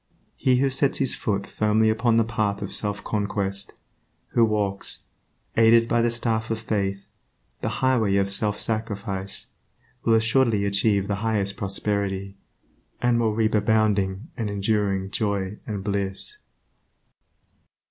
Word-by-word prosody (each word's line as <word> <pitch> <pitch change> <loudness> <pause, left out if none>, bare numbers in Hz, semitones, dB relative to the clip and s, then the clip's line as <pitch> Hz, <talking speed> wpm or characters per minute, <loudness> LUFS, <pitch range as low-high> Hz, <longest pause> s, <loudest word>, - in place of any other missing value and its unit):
He 130 -1 +2
who 135 +2 +2
sets 135 +1 +1
his 135 -2 +1
foot 100 -2 -2
firmly 110 +1 +1
upon 115 +1 +2
the 115 - +5
path 110 -3 -1
of 100 - -4
self 100 -1 +1
conquest, 100 -2 -1 0.6
who 115 - +3
walks, 105 -3 0 0.5
aided 115 0 +5
by 120 0 +2
the 120 - +2
staff 115 -1 -1
of 115 - -1
Faith, 100 -3 -2 0.6
the - - -1 0.2
highway 115 -7 +3
of 100 0 +1
self 105 +1 +1
sacrifice, 100 -3 -3 0.5
will 115 - +4
assuredly 110 -2 +2
achieve 100 0 +2
the 100 -2 -1
highest 105 -3 0
prosperity, 100 -2 -2 0.6
and 120 -1 +2
will 110 -2 +1
reap 110 -1 +1
abounding 105 - +1
and 115 -4 -3
enduring 100 -1 0
joy 100 -2 -2
and 105 -3 -4
bliss. 100 - -3
105 Hz, 135 wpm, -24 LUFS, 100-115 Hz, 0.6 s, the